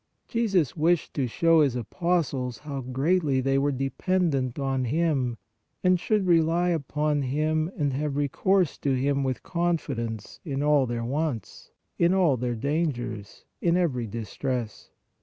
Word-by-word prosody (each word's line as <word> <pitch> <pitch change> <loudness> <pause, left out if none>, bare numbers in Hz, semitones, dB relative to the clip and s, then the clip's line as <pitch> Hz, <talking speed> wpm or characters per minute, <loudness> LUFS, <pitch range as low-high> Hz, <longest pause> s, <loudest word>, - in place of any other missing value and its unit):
Jesus 195 - +1
wished 170 +1 +1
to 135 -4 0
show 165 +6 +4
His 140 -5 +2
apostles 130 - -1
how 140 +1 -6
greatly 135 +3 +1
they 135 +1 +2
were 145 +1 +1
dependent 135 -1 0
on 135 -2 -1
Him 135 -4 0 0.5
and 180 -1 +4
should 210 +2 +1
rely 170 0 +3
upon 150 -2 0
Him 155 +4 0
and 145 -4 0
have 145 +1 -2
recourse 170 +5 +1
to 140 -2 +1
Him 140 +2 +1
with 130 -2 -2
confidence 140 - -2
in 140 -4 -2
all 145 -3 +3
their 120 -1 -3
wants, 135 -5 -3 0.3
in 175 +2 +4
all 175 -8 +4
their 120 0 -2
dangers, 120 -5 -3 0.2
in 170 0 +3
every 130 -10 0
distress. 115 0 -4
145 Hz, 140 wpm, -26 LUFS, 130-170 Hz, 0.5 s, show